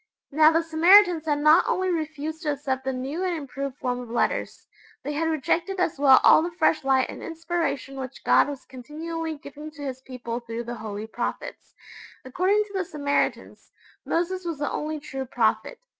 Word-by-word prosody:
Now 310 +2 +6
the 330 +1 +2
Samaritans 335 +1 +5
had 290 -1 +1
not 310 +4 +6
only 370 0 0
refused 315 -1 -4
to 300 -4 0
accept 265 -2 -3
the 265 - 0
new 270 +7 -4
and 360 -2 -1
improved 275 -2 -6
form 250 -2 -2
of 245 -2 -8
letters 235 - -1 0.4
they 295 +2 -3
had 320 +2 0
rejected 340 +5 -1
as 335 -6 0
well 270 -2 +7
all - - +7
the 340 - -2
fresh 325 -3 +1
light 265 -1 +2
and - - -9
inspiration 325 -5 -3
which 260 -2 -7
God - - +4
was 280 -2 -7
continually 315 +5 -6
giving 290 +2 -10
to 295 -1 -11
His 260 -2 -5
people 245 -3 -6
through 235 0 -6
the 240 +1 -6
Holy 215 -2 -6
prophets. 220 - -6 0.5
According 375 +10 +1
to 410 -1 -15
the 380 -1 -1
Samaritans, 285 -4 -2 0.3
Moses 365 +2 -1
was 335 -3 -4
the 290 0 -2
only 305 0 -3
true 270 -3 -6
prophet. 240 - 0
300 Hz, 185 wpm, -25 LUFS, 265-330 Hz, 0.5 s, well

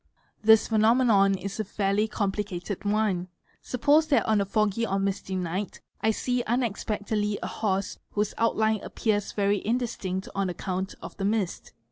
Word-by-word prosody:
This 220 0 +6
phenomenon 220 -3 +4
is 200 +2 -6
a - - +1
fairly 205 +1 0
complicated. 200 -2 -3
one: 205 -4 +1 0.3
suppose 290 +5 +3
that 290 - +3
on 215 -2 +3
a - - 0
foggy 215 +2 +1
or 195 -3 0
misty 195 -1 -2
night 185 +2 -3 0.2
I 220 - +2
see 245 +3 0
unexpectedly 210 -3 -1
a - - -2
horse 195 -2 -1
_ - - -30 0.2
whose 210 0 0
outline 220 -1 +2
appears 210 -3 -1
very 200 -1 +1
indistinct 210 -5 -2
on 195 -1 0
account 185 +1 -3
of - - -8
the 195 - -2
mist. 205 -3 -1
205 Hz, 155 wpm, -27 LUFS, 195-220 Hz, 0.3 s, This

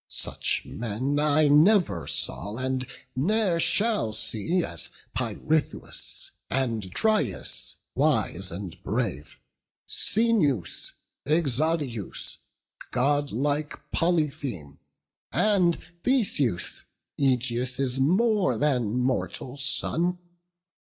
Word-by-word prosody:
Such - - -1
men 120 +6 -2
I 150 0 +4
never 150 - +4
saw, 105 +2 0
and 130 0 -1 0.3
ne'er 185 +4 +2
shall 205 - +2
see, 110 - -1
As 85 -3 -5 0.2
Pirithous 130 +6 -2 0.2
and 115 -7 -1
Dryas, 205 - 0 0.2
wise 95 +2 +1
and 90 0 -7
brave, 105 - -3 0.5
Coeneus, 200 - +1 0.3
Exadius, 145 - 0 0.5
godlike 145 +2 0 0.2
Polypheme, 145 - -1 0.5
And 185 -5 +3 0.3
Theseus, 190 - +1 0.4
Ægeus' 125 0 +1
more 195 - +3
than 125 -6 +1
mortal 125 0 -1
son. 165 +5 0
135 Hz, 80 wpm, -27 LUFS, 115-165 Hz, 0.5 s, I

